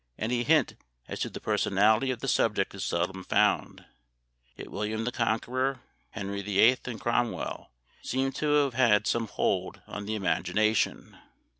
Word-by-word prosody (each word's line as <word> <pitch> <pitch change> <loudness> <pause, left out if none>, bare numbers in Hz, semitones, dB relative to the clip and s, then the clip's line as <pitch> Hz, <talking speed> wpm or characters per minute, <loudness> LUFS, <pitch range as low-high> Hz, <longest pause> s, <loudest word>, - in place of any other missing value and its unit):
Any 120 +2 -1
hint 155 +5 +2 0.3
as - - -6
to - - -1
the - - -8
personality 110 +6 +2
of 125 -3 -3
the 135 - -4
subject 105 -6 +1
is 100 - -5
seldom 90 +2 -2
found, - - +1 0.7
yet - - -10
William 105 +2 -2
the 120 - -2
Conqueror, 125 +3 -1 0.3
Henry 100 -1 -5
VIII, 105 +5 +4
and 120 -3 -5
Cromwell, 120 0 -2 0.3
seem 135 +1 -1
to 150 +2 -2
have 135 -3 -2
had 115 -5 +3
some 115 +3 0
hold - - -2
on 100 -1 -7
the 110 - -1
imagination. 100 +3 0
110 Hz, 150 wpm, -28 LUFS, 100-125 Hz, 0.7 s, VIII